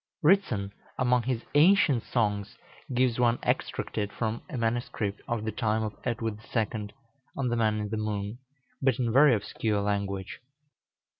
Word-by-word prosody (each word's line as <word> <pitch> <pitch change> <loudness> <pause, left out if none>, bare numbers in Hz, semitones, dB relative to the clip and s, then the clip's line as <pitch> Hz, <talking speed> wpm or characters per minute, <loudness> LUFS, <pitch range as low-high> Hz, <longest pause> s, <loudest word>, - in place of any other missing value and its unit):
Ritson, 135 - +3 0.2
among 125 -1 +3
his 120 -1 -2
"Ancient 155 - +5
Songs," 105 -3 -1 0.3
gives 125 -1 +2
one 120 -1 +3
extracted 105 -1 -1
from 115 0 -2
a 145 - -4
manuscript 115 -3 -1
of 115 -2 -2
the 110 - -1
time 110 0 0
of 105 -1 -3
Edward 115 -3 -2 0.2
II., 110 -2 -1 0.5
on 130 -3 0
the 120 - 0
Man 110 -2 +2
in 105 -1 -3
the 110 - -2
Moon, 105 +1 -3 0.4
but 130 -3 +3
in 120 -3 0
very 135 -1 +7
obscure 105 0 -1
language. 100 -2 -2
115 Hz, 150 wpm, -28 LUFS, 105-125 Hz, 0.5 s, very